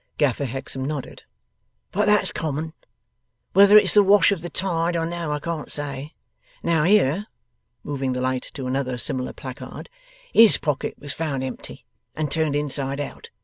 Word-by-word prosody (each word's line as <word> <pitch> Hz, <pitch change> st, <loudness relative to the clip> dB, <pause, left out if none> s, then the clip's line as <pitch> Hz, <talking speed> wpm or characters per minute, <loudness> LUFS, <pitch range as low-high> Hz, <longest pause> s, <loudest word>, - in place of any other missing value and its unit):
Gaffer 140 Hz, -2 st, +1 dB
Hexam 135 Hz, +1 st, -4 dB
nodded. 140 Hz, -1 st, -5 dB, 0.7 s
'But 210 Hz, +2 st, +1 dB
that's 210 Hz, 0 st, +3 dB
common. 155 Hz, +1 st, -3 dB, 0.8 s
Whether 200 Hz, +1 st, +8 dB
it's 210 Hz, -, +5 dB
the 210 Hz, -, +7 dB
wash 200 Hz, 0 st, +5 dB
of 195 Hz, -5 st, -1 dB
the 175 Hz, -, -6 dB
tide 170 Hz, -2 st, -1 dB
or 165 Hz, -, -1 dB
no, 170 Hz, -2 st, -4 dB
I 150 Hz, -, 0 dB
can't 160 Hz, 0 st, -4 dB
say. 145 Hz, 0 st, -3 dB, 0.5 s
Now, 165 Hz, -3 st, +2 dB
here,' 195 Hz, 0 st, +3 dB, 0.6 s
moving 135 Hz, -3 st, -2 dB
the 125 Hz, -, -3 dB
light 130 Hz, 0 st, -2 dB
to 135 Hz, -, -5 dB
another 130 Hz, -1 st, -2 dB
similar 125 Hz, +1 st, 0 dB
placard, 130 Hz, -, -9 dB, 0.4 s
'HIS 225 Hz, -2 st, +7 dB
pockets 145 Hz, -1 st, -3 dB
was 145 Hz, -1 st, -1 dB
found 145 Hz, -5 st, -3 dB
empty, 130 Hz, -1 st, -8 dB, 0.3 s
and 155 Hz, -2 st, -2 dB
turned 155 Hz, -3 st, 0 dB
inside 140 Hz, -1 st, -2 dB
out. 145 Hz, -, -7 dB
150 Hz, 160 wpm, -23 LUFS, 135-170 Hz, 0.8 s, Whether